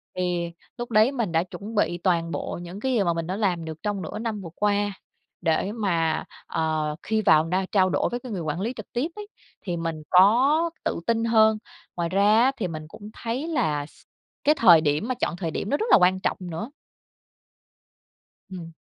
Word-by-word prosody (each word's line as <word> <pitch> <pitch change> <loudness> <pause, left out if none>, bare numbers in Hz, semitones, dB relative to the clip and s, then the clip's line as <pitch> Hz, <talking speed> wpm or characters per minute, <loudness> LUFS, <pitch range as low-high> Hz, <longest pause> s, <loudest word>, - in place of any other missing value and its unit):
Thì 175 -2 -1 0.3
lúc 240 0 -6
đấy 220 +4 +5
mình 235 -9 -2
đã 165 0 +2
chuẩn 205 +4 -9
bị 175 -4 +1
toàn 170 -2 0
bộ - - -4
những 175 +3 -8
cái 260 +4 -1
gì 220 -5 +2
mà 170 -2 +1
mình 165 -1 -3
đã 185 +2 -3
làm 180 -6 0
được 160 0 -8
trong 205 -2 -2
nửa 165 - -6
năm 220 -2 -3
vừa 170 - -8
qua, 205 0 +1 0.5
để 170 +3 +1
mà, 170 -8 0 0.2
ờ, 155 -1 -1
khi 220 0 0
vào 160 -5 +5
na 185 +3 0
trao 190 -2 +3
đổi 145 - 0
với 240 - -3
cái 245 -1 -9
người 190 -4 -3
quản 155 +2 -3
lý 230 +5 -2
trực - - -10
tiếp 250 +5 0
ấy, 420 -1 -8 0.3
thì 175 -3 -3
mình 165 -2 -4
có 255 - +5 0.2
tự - - -1
tin 230 -1 +1
hơn. 220 -1 +4 0.4
Ngoài 170 -1 -1
ra 205 +4 +4
á, 265 - +4
thì 200 - -2
mình 155 -2 -7
cũng 205 +6 -11
thấy 245 +7 -4
là 155 - 0
s - - -20 0.4
cái 300 - +4
thời 180 - +7
điểm 150 +7 0
mà 255 - -1
chọn 235 - -2
thời 170 -3 -3
điểm 195 - -4
nó 285 - +2
rất 440 - -1
là - - +9
quan 185 -1 +3
trọng - - -1
nữa. 180 +4 -5 1.8
Ừm. 170 -3 -8
190 Hz, 215 wpm, -25 LUFS, 165-225 Hz, 1.8 s, là